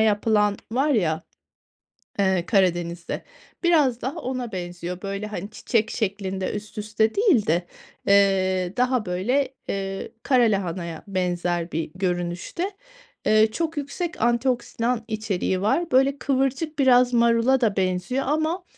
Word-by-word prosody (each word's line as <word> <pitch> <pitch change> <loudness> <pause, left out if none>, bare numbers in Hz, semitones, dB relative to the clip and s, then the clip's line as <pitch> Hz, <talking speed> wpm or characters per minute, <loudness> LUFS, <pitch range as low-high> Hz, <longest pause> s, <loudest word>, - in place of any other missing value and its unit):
yapılan 210 -1 +3 0.2
var 270 +5 +2
ya, 170 - +1 1.0
eee, 190 -3 +2
Karadeniz'de, 175 -4 0 0.4
biraz 295 -9 +3
daha 275 +8 -3
ona 255 -4 -4
benziyor. 175 0 -5
Böyle, 200 +1 -4
hani, 205 -1 -6
çiçek 225 0 0
şeklinde 195 -3 -2
üst 210 +1 -7
üste 215 +1 0
değil 380 - +4
de, 175 +2 +1 0.4
eee, 190 -2 +3
daha 250 -2 +1
böyle, 245 +10 0 0.2
eee, 195 0 -3
kara 255 -3 +4
lahanaya 180 -6 -1
benzer 175 -2 -1
bir 160 -1 -3
görünüşte. 180 - -2 0.5
Eee, 215 0 +5
çok 325 +3 -2
yüksek 320 +4 -4
antioksidan 240 0 0
içeriği 210 -4 -1
var. 325 - +1
Böyle, 270 +2 +4
kıvırcık 275 +3 -1
biraz 250 -2 +5
marula 235 +2 +3
da 215 -4 +2
benziyor 185 +8 0
ama, 315 +5 0
215 Hz, 125 wpm, -24 LUFS, 185-255 Hz, 1.0 s, Eee